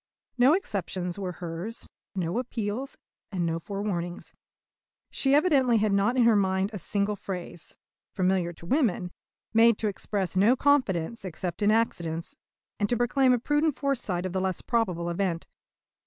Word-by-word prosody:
No 255 +4 +5
exceptions 190 - -3
were 185 -2 -3
hers, 175 +7 -5 0.3
no 180 +4 -1
appeals, 240 +1 -4 0.3
and 180 -3 -1
no 165 0 -1
forewarnings. 180 -2 -4 0.8
She 275 0 +2
evidently 275 -7 +4
had 210 -1 +2
not 200 +6 +2
in 245 - +5
her 230 -1 +5
mind 190 0 +1
a 205 - -3
single 200 +4 0
phrase, 180 -4 -7 0.4
familiar 185 -2 +1
to 170 0 -14
women, 195 - +1 0.4
made 225 -1 +6
to 220 - -1
express 195 -2 -2
no 210 +7 +5
confidence 235 - +1
except 180 0 -5
in 205 - +4
accidents, 170 -7 0 0.4
and 205 -1 +1
to 240 - +2
proclaim 255 +2 +3
a 250 - +4
prudent 295 +4 +1
foresight 235 -11 -1
of 185 - -3
the 190 - 0
less 185 -2 -1
probable 185 -8 0
event. 175 -1 -1
200 Hz, 155 wpm, -27 LUFS, 180-240 Hz, 0.8 s, made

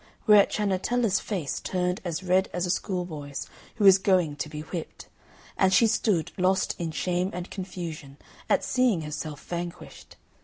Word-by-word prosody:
Whereat 210 -2 +7
Ciannetella's 210 +1 +1
face 180 -10 -3
turned 180 0 -1
as 175 0 -3
red 185 +1 +2
as 175 0 -1
a 180 - 0
schoolboy's 170 -8 -4 0.3
who 215 -3 +1
is 195 -1 +8
going 185 -6 +2
to 150 +1 -4
be 150 0 -6
whipped, 160 +2 -7 0.5
and 190 -1 +4
she 190 +5 +5
stood 210 -6 +1
lost 190 +1 +2
in 170 -2 -2
shame 180 +3 -1
and 180 +1 -6
confusion 170 -7 -7 0.3
at - - +3
seeing 250 -9 +2
herself 150 -1 -5
vanquished. 175 0 -7
180 Hz, 155 wpm, -27 LUFS, 165-195 Hz, 0.5 s, is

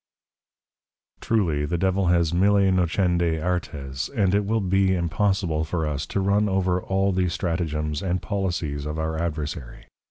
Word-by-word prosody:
_] - - -37
Truly, 85 -10 +1
the 75 +4 -1
Devil 95 +1 +1
has 85 -2 +2
Mille 100 +1 +4
Nocendi 85 -2 +1
Artes; 75 -6 -3
and 100 -8 +1
it 100 0 +2
will 110 +2 +1
be 95 -1 +2
impossible 85 -2 0
for 80 0 -2
us, 75 -1 -3
to - - -2
run 100 +2 +2
over 95 -1 +1
all 95 +1 +1
the 90 -1 +1
Stratagems 80 -4 -2
and 90 -1 -1
Policies 85 -9 -2
of 75 +1 -4
our 80 0 -2
Adversary. 75 -6 -5
90 Hz, 155 wpm, -24 LUFS, 80-95 Hz, -, Mille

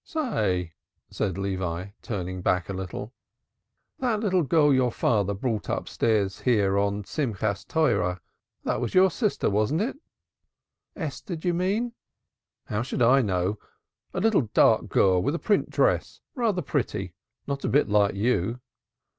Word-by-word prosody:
"Say," 100 - -1 0.4
said 95 -3 -2
Levi, 95 -2 -3
turning 95 -4 -4
back 90 0 0
a - - -2
little. 95 +5 -6 0.9
"That 235 -5 0
little 190 -4 +2
girl 150 -1 +4
your 130 -2 +2
father 100 -4 +1
brought 110 +1 -2
upstairs 105 -4 0
here 105 -6 +2
on 100 0 +1
the - - -4
Rejoicing 145 +10 -3
of - - -11 0.3
the 160 - -2
Law, 95 - +1 0.5
that - - -1
was 120 - -3
your 185 0 +6
sister, 215 0 0
wasn't 110 - +1
it?" 265 +5 -2 1.0
"Esther, 170 +2 -5
d'ye 175 +2 -1
mean?" 200 +7 0 0.7
"How 105 0 -2
should 125 0 -1
I 130 +4 +6
know? 95 -1 -1 0.5
A - - -3
little, 195 - +2
dark - - +4
girl, 95 -2 +3
with 140 - 0
a - - 0
print 205 +3 +1
dress, - - +1
rather 220 - 0
pretty 105 - -2 0.3
not 140 0 -4
a - - 0
bit 145 - +3
like 105 -1 +3
you." 115 +1 0
115 Hz, 155 wpm, -26 LUFS, -, 1.0 s, your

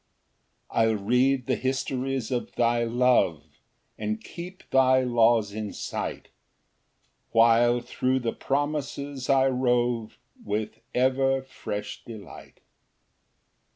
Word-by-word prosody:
2 - - -7
I'll 110 -1 +3
read 125 +5 +2
the 130 - 0
histories 130 -1 -2
of 125 -1 -3
thy 120 0 +2
love, 115 - +2 0.6
And 110 0 -2
keep 180 +2 -10
thy 130 0 +5
laws 115 -4 +3
in 105 -1 -5
sight, - - -5 1.0
While 120 +1 +4
thro' 130 +2 -1
the 120 -3 -2
promises 140 -1 -3
I 135 -1 +5
rove, 120 -3 0 0.3
With 105 +1 -3 0.2
ever 135 +1 +2
fresh 105 -5 -6
delight. 110 -3 -11
125 Hz, 105 wpm, -26 LUFS, 115-130 Hz, 1.0 s, thy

